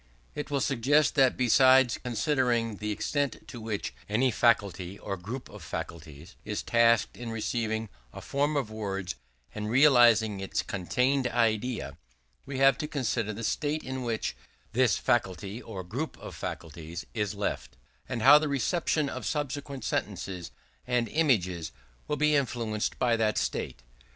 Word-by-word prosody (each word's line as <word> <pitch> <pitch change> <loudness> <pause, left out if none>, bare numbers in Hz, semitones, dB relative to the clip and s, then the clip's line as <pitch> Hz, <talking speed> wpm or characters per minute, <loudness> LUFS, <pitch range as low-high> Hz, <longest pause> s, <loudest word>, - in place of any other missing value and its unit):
It 150 - -5
will 140 -2 0
suggest 140 +3 +3
that 135 -3 +4
besides 130 0 +5
considering 120 -2 0
the 105 +1 -3
extent 140 +6 -2
to 120 -3 -8
which 110 -2 -3 0.2
any 125 +5 +2
faculty 100 -6 +1
or 100 - -4
group 105 +9 -7
of - - -12
faculties 80 +2 -7
is 105 -1 -3
tasked 115 -1 +3
in 120 -1 -6
receiving 110 0 -2 0.2
a - - -9
form 145 +2 0
of 125 -6 -2
words 95 -4 -3 0.4
and 105 0 -4
realizing 120 -6 +5
its 95 - -2
contained 125 +8 0
idea, 110 - 0 0.5
we 135 -1 -4
have 135 0 +5
to 150 - -2
consider 120 -7 -1
the 110 +3 -6
state 150 +6 -1
in 130 0 -4
which 115 - -2 0.4
this 125 -2 +3
faculty 100 0 -1
or 100 -5 -7
group 130 - -4
of - - -9
faculties 80 +2 -6
is 105 -2 -2
left; 100 -9 -3 0.3
and 115 -3 -2
how 140 +3 +9
the 155 -1 -2
reception 150 +2 0
of - - -5
subsequent 145 -3 -3
sentences 95 -4 -3 0.4
and 125 -2 +1
images 95 - +1 0.4
will 150 - -1
be 150 0 +3
influenced 115 -6 -1
by 120 -2 +2
that 110 -1 +1
state. - - -2
115 Hz, 150 wpm, -28 LUFS, 105-135 Hz, 0.5 s, how